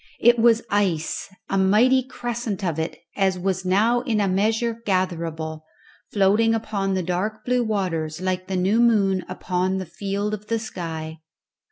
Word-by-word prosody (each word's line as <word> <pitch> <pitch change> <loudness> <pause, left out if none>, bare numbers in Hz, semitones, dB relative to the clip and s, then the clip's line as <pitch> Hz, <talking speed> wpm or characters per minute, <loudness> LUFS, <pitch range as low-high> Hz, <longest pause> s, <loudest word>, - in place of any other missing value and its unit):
It 240 0 +5
was 230 0 +4
ice! 185 -6 0 0.2
a 195 - 0
mighty 225 +7 +4
crescent 240 -5 -4
of 165 -4 -1
it 160 - -3 0.2
as 190 -2 +1
was 190 0 -1
now 215 +6 +3
in 235 -5 0
a 200 - +2
measure 220 +4 0
gatherable, 165 -5 -2 0.5
floating 210 +3 +3
upon 200 -3 -1
the 185 - -1
dark 210 +5 -2
blue 250 0 +2
waters 175 -7 -2
like 185 0 -2
the 190 -1 -1
new 195 +5 +2
moon 200 -5 +3
upon 185 +1 -1
the 190 - -3
field 200 +4 -3
of 210 0 -6
the 230 - 0
sky. 160 -7 -6
195 Hz, 160 wpm, -23 LUFS, 180-220 Hz, 0.5 s, It